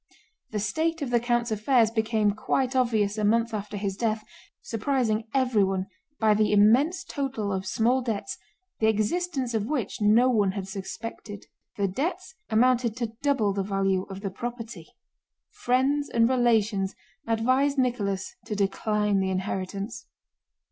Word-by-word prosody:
The 215 Hz, -, -4 dB
state 320 Hz, +9 st, -1 dB
of 255 Hz, -, -4 dB
the 240 Hz, -, +4 dB
count's 240 Hz, 0 st, 0 dB
affairs 220 Hz, +1 st, +3 dB
became 220 Hz, -2 st, +1 dB
quite 255 Hz, +5 st, -1 dB
obvious 220 Hz, -5 st, +1 dB
a -, -, -1 dB
month 230 Hz, +2 st, +2 dB
after 210 Hz, 0 st, -4 dB
his 195 Hz, -1 st, -2 dB
death, 215 Hz, 0 st, -1 dB, 0.4 s
surprising 225 Hz, -2 st, -1 dB
everyone 205 Hz, -8 st, +1 dB, 0.3 s
by 220 Hz, -1 st, +4 dB
the 210 Hz, 0 st, +2 dB
immense 245 Hz, -, +4 dB
total 260 Hz, -8 st, -3 dB
of 190 Hz, 0 st, -3 dB
small 230 Hz, +8 st, +2 dB
debts 240 Hz, +2 st, -3 dB, 0.4 s
the 220 Hz, -, +3 dB
existence 255 Hz, -, 0 dB
of 215 Hz, -1 st, -1 dB
which 250 Hz, -8 st, -3 dB
no 220 Hz, +4 st, +5 dB
one 210 Hz, -6 st, +2 dB
had 195 Hz, -2 st, -5 dB
suspected. 205 Hz, +1 st, -7 dB, 0.3 s
The 200 Hz, -1 st, +1 dB
debts 350 Hz, -, -3 dB, 0.2 s
amounted 240 Hz, 0 st, +2 dB
to 235 Hz, -3 st, -3 dB
double 270 Hz, -9 st, +2 dB
the 195 Hz, -, -1 dB
value 195 Hz, -1 st, 0 dB
of 195 Hz, 0 st, -7 dB
the 195 Hz, -2 st, -3 dB
property. 235 Hz, +2 st, -6 dB, 0.6 s
Friends 270 Hz, +4 st, +1 dB
and 230 Hz, -1 st, +3 dB
relations 225 Hz, -6 st, +2 dB, 0.3 s
advised 255 Hz, +5 st, +2 dB
Nicholas 205 Hz, -7 st, -1 dB
to 210 Hz, -, -4 dB
decline 205 Hz, +1 st, +1 dB
the 190 Hz, 0 st, 0 dB
inheritance. 190 Hz, +2 st, -4 dB
220 Hz, 145 wpm, -26 LUFS, 205-250 Hz, 0.6 s, no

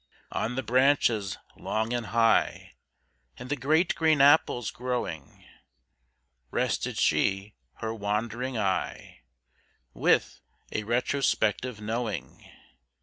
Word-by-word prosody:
On 120 Hz, +3 st, -2 dB
the 130 Hz, -, -2 dB
branches 120 Hz, -5 st, +2 dB, 0.2 s
long 110 Hz, +2 st, -2 dB
and 120 Hz, -3 st, -2 dB
high, 115 Hz, 0 st, +2 dB, 0.6 s
And 125 Hz, -, -9 dB
the -, -, +2 dB
great 155 Hz, +6 st, +2 dB
green 160 Hz, -2 st, +2 dB
apples 140 Hz, -4 st, +4 dB
growing, 125 Hz, -10 st, -5 dB, 1.0 s
Rested -, -, -1 dB
she 95 Hz, +1 st, +1 dB, 0.2 s
her 110 Hz, 0 st, -4 dB
wandering 115 Hz, +4 st, -2 dB
eye, 95 Hz, -5 st, -2 dB, 0.7 s
With -, -, +1 dB, 0.3 s
a 110 Hz, -, -3 dB
retrospective 120 Hz, -1 st, 0 dB
knowing. 110 Hz, -2 st, -4 dB
115 Hz, 95 wpm, -27 LUFS, 105-130 Hz, 1.0 s, apples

